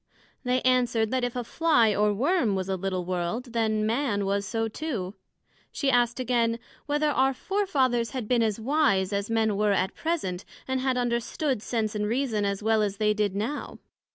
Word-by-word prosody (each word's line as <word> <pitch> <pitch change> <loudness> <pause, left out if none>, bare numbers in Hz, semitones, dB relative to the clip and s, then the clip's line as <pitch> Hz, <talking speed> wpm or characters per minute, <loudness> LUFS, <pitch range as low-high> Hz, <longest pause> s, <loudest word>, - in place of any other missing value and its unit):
They 250 0 0
answered, 240 -3 +2
That 260 -1 0
if 245 0 -2
a 245 - -2
Fly 240 -5 +3
or 210 +1 +2
Worm 250 - +1
was 190 -1 -2
a 190 - +1
little 185 -1 -3
World, 185 +8 -3
then 220 -2 +1
Man 225 -3 0
was 200 0 -1
so 225 +1 -1
too. 220 -7 -4 0.6
she 275 -2 0
asked 240 0 +2
again, 235 -2 +1 0.3
Whether 295 +1 +1
our 265 -1 +2
Fore 395 +8 -1
fathers 250 - +1
had 245 -2 -5
been 245 0 +2
as 220 -1 0
wise, 220 -7 +2
as 200 +1 -2
Men 220 -2 +1
were 210 -1 +2
at 190 -1 0
present, 300 - -2 0.2
and 260 0 0
had 260 -1 0
understood 245 +2 -1
sense 220 -2 -2
and 210 -1 -1
reason, 230 -3 0
as 200 +1 -2
well 220 0 +3
as 200 -1 -1
they 210 0 +2
did 210 -2 -1
now? 225 +9 -3
230 Hz, 190 wpm, -27 LUFS, 205-255 Hz, 0.6 s, Fly